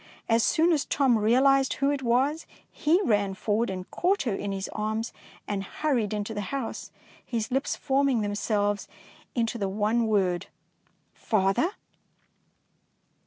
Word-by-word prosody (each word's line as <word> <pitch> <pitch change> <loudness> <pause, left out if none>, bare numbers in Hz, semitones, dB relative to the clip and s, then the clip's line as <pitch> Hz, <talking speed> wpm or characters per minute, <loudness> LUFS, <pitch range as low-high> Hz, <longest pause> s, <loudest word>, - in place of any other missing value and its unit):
As 230 0 +3
soon 335 +1 +3
as 305 -4 +2
Tom 270 -4 +2
realised 265 +5 +4
who 275 +1 +1
it 285 -1 -2
was, 265 +6 +1 0.2
he 320 +5 +2
ran 205 - +1
forward 215 +3 0
and 185 -1 -5
caught 380 +3 +1
her 235 -6 -1
in 200 +1 -3
his 195 0 -3
arms, 220 +2 -2 0.3
and 200 -2 -2
hurried 240 -2 -1
into 210 +1 -3
the 210 - -3
house, 275 -4 -4 0.3
his 225 -1 -3
lips 270 +2 0
forming 270 -3 +1
themselves 205 0 -1 0.5
into 235 -1 -1
the 195 -2 -1
one 215 +3 +1
word, 190 -5 +1 0.4
" - - -41
Father?" 215 - +1
225 Hz, 145 wpm, -27 LUFS, 205-275 Hz, 0.5 s, realised